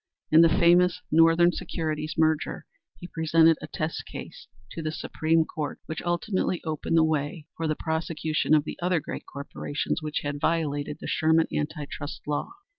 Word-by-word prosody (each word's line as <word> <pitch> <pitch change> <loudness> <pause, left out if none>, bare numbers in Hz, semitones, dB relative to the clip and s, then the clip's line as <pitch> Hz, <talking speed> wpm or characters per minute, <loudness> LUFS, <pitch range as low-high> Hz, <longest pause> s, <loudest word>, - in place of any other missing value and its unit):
In 160 +1 +8
the 165 - +7
famous 175 +1 +4
Northern 165 +2 +5
Securities 155 -3 -3
merger 160 -1 +1 0.3
he - - -10
presented 160 -1 +3
a 155 - -6
test 155 +1 -3
case - - -9 0.2
to 165 - -5
the 155 -1 -2
Supreme 160 +1 +1
Court 150 -2 -5
which 160 - -5
ultimately 175 +1 -1
opened 160 +1 -1
the 160 - +6
way 155 0 -1
for 165 - -2
the 155 - 0
prosecution 160 -1 0
of 150 - +3
the - - -7
other 180 -1 +2
great 155 - -7
corporations 140 +1 -3
which 155 -1 -3
had 145 0 -4
violated 150 -3 0
the - - -7
Sherman 160 +1 +3
Anti 150 0 -2
trust 145 +1 -7
Law. 145 0 -2
160 Hz, 170 wpm, -26 LUFS, 150-165 Hz, 0.3 s, In